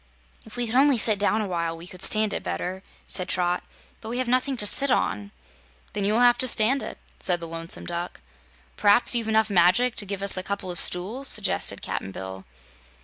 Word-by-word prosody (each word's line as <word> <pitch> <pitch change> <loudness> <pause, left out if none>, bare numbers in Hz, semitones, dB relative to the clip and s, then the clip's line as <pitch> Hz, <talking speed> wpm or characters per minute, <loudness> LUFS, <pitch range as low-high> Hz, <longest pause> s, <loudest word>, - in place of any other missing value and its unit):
"If 220 - -13
we 245 - -1
could 225 - -5
only 275 +1 +4
sit 215 -2 +3
down 210 +1 +1
a 210 - -3
while, 170 -2 -3
we 165 - -10
could 180 0 -12
stand 215 0 +2
it - - -3
better," 180 - -5 0.2
said 185 -1 -3
Trot, 180 0 -1 0.4
"but 220 - -8
we 240 - -3
have 255 -1 -1
nothing 255 +2 0
to 210 - +3
sit 275 +7 +3
on." 105 - -1 0.6
"Then 205 -1 -2
you 205 - +1
will 230 - +2
have 245 0 +4
to 255 - +2
stand 245 +4 +2
it," - - -7 0.2
said 175 -2 +1
the 170 - -7
Lonesome 165 +1 -6
Duck. 175 0 -5 0.6
"P'raps 205 +5 +4
you've 230 -2 0
enough 220 -1 +1
magic 195 +7 +3
to 205 - +2
give 200 0 -4
us 200 - +4
a - - -1
couple 195 -1 -5
of 175 - -6
stools," 215 +10 +2
suggested 210 -5 +1
Cap'n 95 - -5
Bill. 95 0 -8
205 Hz, 215 wpm, -24 LUFS, 175-235 Hz, 0.6 s, only